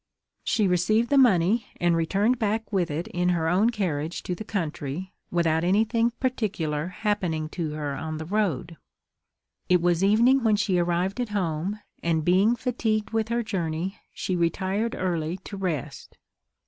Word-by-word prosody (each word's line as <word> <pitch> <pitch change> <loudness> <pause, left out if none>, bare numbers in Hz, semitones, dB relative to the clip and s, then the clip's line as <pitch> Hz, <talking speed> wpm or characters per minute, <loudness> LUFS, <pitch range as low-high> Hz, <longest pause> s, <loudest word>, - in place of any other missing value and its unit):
She 210 -3 +2
received 215 +7 +2
the 285 - +5
money, 215 -2 +4
and 175 -1 +3
returned 200 +9 +1
back 220 0 -1
with 180 -4 +1
it 155 +4 -3
in 180 0 0
her 165 -2 +1
own 190 +7 +3
carriage 170 -8 -2
to 180 - -2
the 200 - -6
country, 170 -3 -4 0.2
without 165 -2 +1
anything 220 +5 +2
particular 185 - -1
happening 180 -5 -1
to 160 -3 -3
her 150 -2 -3
on 155 +2 -4
the 160 - -5
road. 175 -4 -1 0.9
It 180 -1 +5
was 175 +1 +2
evening 235 +6 +4
when 220 -2 +4
she 200 -3 +1
arrived 175 +5 0
at 240 - -2
home; 190 +1 -2 0.2
and 160 -2 0
being 195 +6 +4
fatigued 225 -3 -1
with 225 -1 0
her 235 0 0
journey, 180 -3 -3
she 185 - -3
retired 190 +6 0
early 170 -2 -1
to 205 - -7
rest. 180 -8 -4
185 Hz, 160 wpm, -26 LUFS, 165-215 Hz, 0.9 s, the